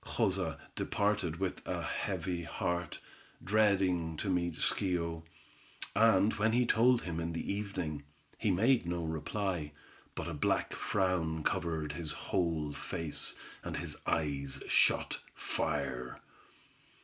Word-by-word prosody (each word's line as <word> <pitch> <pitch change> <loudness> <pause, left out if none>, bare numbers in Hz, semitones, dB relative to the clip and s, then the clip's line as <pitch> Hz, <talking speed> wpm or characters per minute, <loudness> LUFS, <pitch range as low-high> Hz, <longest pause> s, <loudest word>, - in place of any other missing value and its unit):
Joza - - 0 0.2
departed 100 -5 +1
with 95 -1 -2
a - - -2
heavy 90 -2 -2
heart, 85 +2 -2 0.4
dreading 95 -6 +3
to 95 - -1
meet 85 -2 +1
Schio; 85 -3 0 0.7
and 110 -2 +5
when 110 +1 +3
he 125 +1 +4
told 120 +1 +4
him 85 -2 -3
in 85 0 -2
the 85 - -2
evening, 95 -7 -3 0.4
he 110 - +1
made 110 +2 +4
no 85 -1 -1
reply, 80 0 -2 0.4
but - - -3
a 85 - -3
black 75 - +1
frown 90 -5 0
covered 80 -5 0
his 80 0 -5
whole 80 -5 -1
face, 80 +2 -2 0.3
and - - -3
his - - -4
eyes 70 -4 -1
shot - - +3 0.2
fire. 65 -4 -2
85 Hz, 125 wpm, -33 LUFS, 80-100 Hz, 0.7 s, and